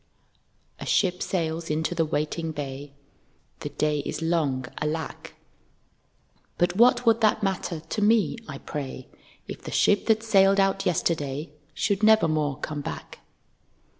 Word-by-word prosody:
A - - -6
ship 180 -2 +2
sails 165 -2 -2
into 160 +3 0
the 165 -2 +1
waiting 160 +2 -2
bay, 140 -1 -6 0.7
(The - - -5
day 150 -1 0
is 145 - -4
long, 155 -6 0 0.2
alack,) 155 +1 -4 1.2
But 175 +1 +1
what 245 +3 +5
would 230 0 +4
that 215 -1 +3
matter 185 -4 -2
to 210 - -4
me, 215 +2 +3
I 140 - -6
pray 135 -3 -6 0.4
If - - -7
the - - -8
ship 205 -1 +2
that 220 -1 +3
sailed 195 -3 +4
out 195 0 +2
yesterday 155 -4 -1 0.2
Should 200 -1 0
never 220 -4 +5
more 150 -3 0
come 150 -1 -4
back. - - -7
165 Hz, 140 wpm, -26 LUFS, 150-195 Hz, 1.2 s, what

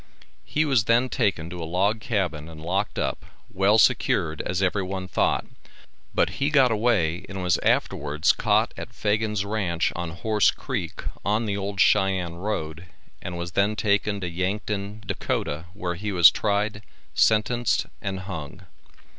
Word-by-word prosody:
He 155 +1 +1
was 130 -8 +2
then 120 +3 +3
taken 100 -11 0
to 90 -1 -6
a - - -3
log 95 +7 +1
cabin 90 - -2
and 80 -1 -11
locked 95 +6 -2
up, - - -2 0.3
well 100 +3 +4
secured 80 -7 +2
as 90 0 -2
every 95 +2 +1
one 95 0 -4
thought, - - +1 0.7
but - - +2
he 140 - +3
got 135 -5 +4
away 105 -7 +1
and 95 -1 -5
was 90 -2 +2
afterwards 75 +3 +1
caught - - +1
at - - -8
Fagan's 105 -1 0
ranch 95 -6 -1
on 85 -1 -3
Horse 105 +5 +2
Creek, - - -4 0.2
on 105 +3 +1
the 100 -2 -1
old 100 0 -4
Cheyenne 95 -3 +2
road 85 -4 -4 0.3
and 90 -1 -5
was 85 0 -5
then 100 +3 +1
taken 100 -1 +1
to 90 - -2
Yankton, 100 +4 -3
Dak., - - -5 0.5
where 90 -3 -3
he 105 +4 -4
was 85 -3 +8
tried, 105 0 -1 0.3
sentenced 110 +2 +2 0.2
and 95 -3 -3
hung. 80 -7 -7
100 Hz, 155 wpm, -25 LUFS, 85-105 Hz, 0.7 s, was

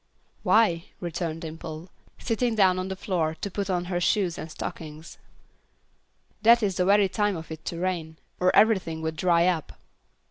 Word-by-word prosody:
"Why," 180 -7 +3
returned 170 -2 -4
Dimple, 160 +1 -8 0.3
sitting 235 0 -1
down 185 -3 +4
on 185 - -3
the 190 - -4
floor 170 -5 -1
to 200 - -4
put 200 +1 -3
on 180 -1 0
her 175 -1 -2
shoes 180 -2 +1
and 160 - -6
stockings, 155 +1 -8 1.2
"that 235 +1 +6
is 195 -3 0
the 180 - +2
very 200 +1 +5
time 205 -2 0
for 160 0 -8
it 160 - -11
to 170 - -4
rain, 170 -3 -3 0.2
or 180 - +3
everything 185 -7 +3
would 160 0 -2
dry 170 +1 +3
up." 175 -4 0
180 Hz, 170 wpm, -26 LUFS, 160-195 Hz, 1.2 s, that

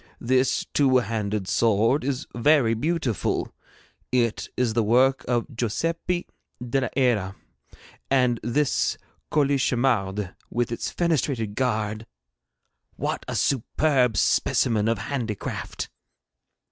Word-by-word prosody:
This 130 +2 +1
two 135 -3 +4
handed 105 -4 -2
sword 115 +6 +2
is 135 -1 -2
very 120 -1 +3
beautiful. 130 - -1 0.6
It 120 -3 0
is 125 -3 +1
the 115 - +2
work 125 +5 +3
of 120 +2 -1
Josepe 165 - -1 0.3
de 125 +2 -1
la 130 - 0
Hera; 110 -8 +1 0.7
and 125 -3 +2
this 135 +5 0 0.3
colichemarde 120 -9 +1 0.2
with 120 0 -1
its 115 - -3
fenestrated 140 -10 0
guard 110 -2 -1 0.9
what - - -3
a - - -3
superb 130 -2 +1
specimen 110 -4 +2
of 115 0 +1
handicraft!' 115 -2 -4
120 Hz, 105 wpm, -25 LUFS, 110-135 Hz, 0.9 s, two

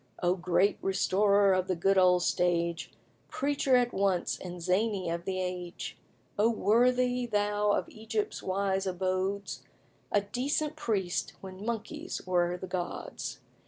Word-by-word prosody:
O 175 0 +4
great 180 +2 +2
restorer 200 +1 +3
of 185 0 +1
the 185 - 0
good 195 +4 +2
old 180 -1 +5
stage, 170 -1 0 0.4
Preacher 275 -2 +1
at 245 -1 +2
once 190 -3 +1
and 180 -1 -7
zany 185 +1 0
of 170 +1 -4
the 185 -1 -2
age! 180 -1 -4 0.4
O 220 +2 +5
worthy 245 +3 +2
thou 205 -1 +1
of - - 0
Egypt's 220 -1 -3
wise 195 0 0
abodes! 185 +2 -2 0.5
A 205 - +3
decent 280 +8 -1
priest 205 - -1
when 190 0 -9
monkeys 235 +10 -4
were 175 -1 +1
the 185 - -6
gods. 180 -2 -5
195 Hz, 135 wpm, -30 LUFS, 180-220 Hz, 0.5 s, old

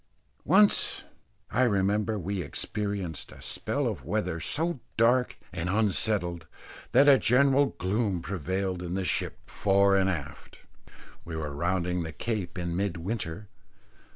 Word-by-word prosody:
Once, 200 +5 +4 0.5
I 130 - +1
remember, 105 -1 +2
we 100 +1 -3
experienced 95 +1 -4
a - - -13
spell - - -2
of - - -3
weather 90 +1 -2
so 160 - -1 0.2
dark 125 +2 +3 0.2
and 85 0 -3
unsettled, 95 -4 +1 0.4
that 145 - +6
a 135 -2 +7
general 140 +3 +3
gloom 95 -1 -1
prevailed 95 0 -2
in 90 0 -4
the 95 -1 -1
ship - - -2
fore 100 0 +3
and 95 0 +3
aft. 75 -6 -6 0.6
We 85 - -7
were 75 -2 -4
rounding 90 +3 0
the 80 -1 -5
Cape 100 -4 -3
in 85 -1 -2
mid 95 -2 -1
winter. 100 +1 -4
95 Hz, 135 wpm, -28 LUFS, 85-110 Hz, 0.6 s, a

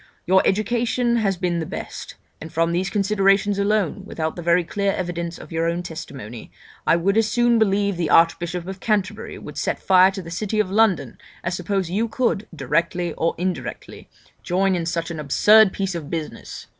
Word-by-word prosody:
Your 190 +1 +5
education 235 +3 +1
has 195 -5 0
been 175 -2 -1
the 160 - -3
best; - - -7 0.3
and 160 - -8
from 165 +1 +1
these 180 +3 0
considerations 200 0 +2
alone, 200 -2 0
without 160 -4 -4
the 175 - -6
very 170 +1 +3
clear 200 +3 -1
evidence 170 -2 -4
of - - -12
your 165 0 0
own 170 +1 -2
testimony, 140 -10 -8 0.4
I - - +5
would 195 +5 +1
as 225 -1 +3
soon 240 0 +3
believe 200 -2 +1
the 170 -3 -1
Archbishop 170 +1 +2
of 190 0 -6
Canterbury 205 -3 -2
would - - -8
set - - -1
fire 185 0 +5
to 195 -1 -6
the 165 - -9
city 215 +5 -2
of 200 -3 0
London 215 -2 +2 0.2
as 175 - -2
suppose 180 0 -2
you 220 +5 0
could, 225 -3 -1
directly 165 +4 -1
or 165 - -1
indirectly, 175 -6 -5 0.3
join 190 +2 +1
in 170 -2 -1
such 170 0 -2
a - - -3
d - - -7
d - - -4
absurd 210 +8 +5
piece 195 -1 -2
of 160 -4 -6
business. 160 -3 -6
185 Hz, 195 wpm, -22 LUFS, 170-205 Hz, 0.4 s, Your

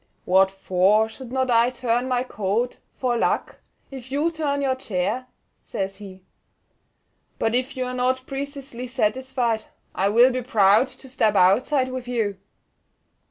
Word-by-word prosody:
"What 190 +1 +4
for 195 +3 +2
should 240 +2 -11
not 260 -1 0
I 235 +1 +4
turn 245 0 -1
my 250 -1 +1
coat, 220 +1 -2 0.2
for 250 -2 0
luck, 235 - -1 0.3
if 260 -1 -9
you 300 +5 +1
turn 290 -3 -1
your 265 -1 +2
chair?" 250 0 -2 0.4
says 195 0 -4
he. 190 -2 -11 1.1
"But 225 - 0
if 255 +2 -1
you 255 - -1
are 250 - -4
not 255 +1 0
preceesely 275 -3 -6
satisfied, 245 -1 -1 0.3
I 195 +1 +1
will 240 +5 +6
be 255 0 -2
proud 215 0 +4
to 265 +1 -12
step 220 -5 +1
outside 255 +9 +3
with 255 -1 -6
you." 220 -6 -1
245 Hz, 150 wpm, -23 LUFS, 210-260 Hz, 1.1 s, will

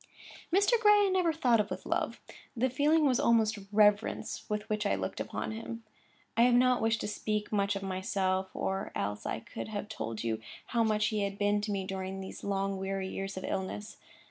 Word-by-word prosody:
Mr. 405 +6 +4
Gray 420 -1 +6
I - - +2
never 365 -3 +2
thought 250 -8 +3
of 210 0 0
with - - -5
love; - - -1 0.4
the 255 +2 +2
feeling 300 +4 +3
was 255 -4 +3
almost 225 -2 +3
reverence 210 0 +2
with 210 0 -2
which 215 -1 -1
I 205 - +2
looked - - -4
upon - - -3
him. 230 +1 -6 0.5
I 230 - +3
have 245 0 +6
not 250 0 +4
wished 225 0 +1
to - - -2
speak 210 0 -2
much 200 -1 +1
of 195 - -4
myself, 190 -1 -1
or 195 +1 -2
else 105 +1 -2
I - - -2
could - - -7
have 210 -1 -4
told 115 - -4
you 110 -1 -1 0.2
how 235 -1 +1
much 215 -1 +2
he 215 -2 -1
had 200 0 -2
been 205 0 +2
to 210 0 -2
me 195 -2 -1
during 190 0 -4
these 190 - -8
long, 195 -1 -1
weary 190 0 -2
years 195 0 -5
of 185 - -4
illness. 205 +3 -4
210 Hz, 205 wpm, -31 LUFS, 195-235 Hz, 0.5 s, Gray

